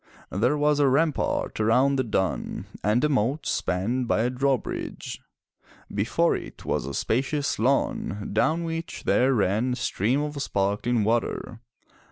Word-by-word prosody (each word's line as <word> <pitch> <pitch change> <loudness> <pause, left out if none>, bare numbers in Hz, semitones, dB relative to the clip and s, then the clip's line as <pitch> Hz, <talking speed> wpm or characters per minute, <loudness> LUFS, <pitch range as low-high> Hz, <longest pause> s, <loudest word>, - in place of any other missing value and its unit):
There 120 +10 +1
was 150 0 +2
a 145 - +4
rampart 145 -1 +1
around 125 +6 +3
the 130 - +2
dun 95 -5 -2 0.2
and 105 +4 +2
a - - +5
moat 135 +2 0
spanned 115 +8 -1
by 110 - +2
a 120 +2 +1
drawbridge. 135 0 -2 0.7
Before 120 +12 +2
it - - -8
was 65 - -1
a 70 - -4
spa 115 +4 +1
cious 140 -2 -2
lawn, 110 -4 0
down 160 +10 +2
which 165 0 -5
there 125 +7 +3
ran 110 +4 +1
a - - -1
stream 120 +2 0
of 145 -1 -4
sparkling 105 +1 0
water. 115 +1 -1
125 Hz, 150 wpm, -26 LUFS, 105-140 Hz, 0.7 s, a